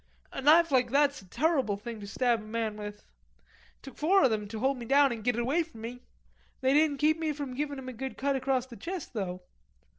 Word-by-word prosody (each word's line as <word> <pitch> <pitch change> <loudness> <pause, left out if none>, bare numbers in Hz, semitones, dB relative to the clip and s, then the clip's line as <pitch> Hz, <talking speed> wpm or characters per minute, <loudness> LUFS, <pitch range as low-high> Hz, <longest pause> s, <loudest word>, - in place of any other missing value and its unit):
A - - -5
knife 320 +3 +6
like 250 -2 +3
that's 280 0 +2
a 190 - -18
turruble 265 - +1
thing 225 +2 -7
to 200 - -8
stab 235 +2 +1
a - - -11
man 220 0 -3
with. 205 0 -7
It - - -31 0.8
took 270 - -11
four 375 +6 +4
of 255 - +4
'em 210 -1 -3
to 220 +2 -6
hold 265 +4 +1
me 235 - -7
down 280 +1 +5
an' 230 -2 -4
git 245 +2 +1
it 240 - 0
away 275 +8 +1
from 320 -9 -9
me. 245 +2 -7 0.6
They 265 +1 +3
didn't 300 -1 +3
keep 310 +3 +2
me 315 -2 -1
from 285 -3 -5
givin' 285 +2 -3
him 265 -1 -8
a 255 - -5
good 265 +3 -6
cut 275 0 0
across 260 -1 0
the 245 -3 -12
chest, 355 -5 -6
though. 185 -4 -4
260 Hz, 245 wpm, -29 LUFS, 225-290 Hz, 0.8 s, knife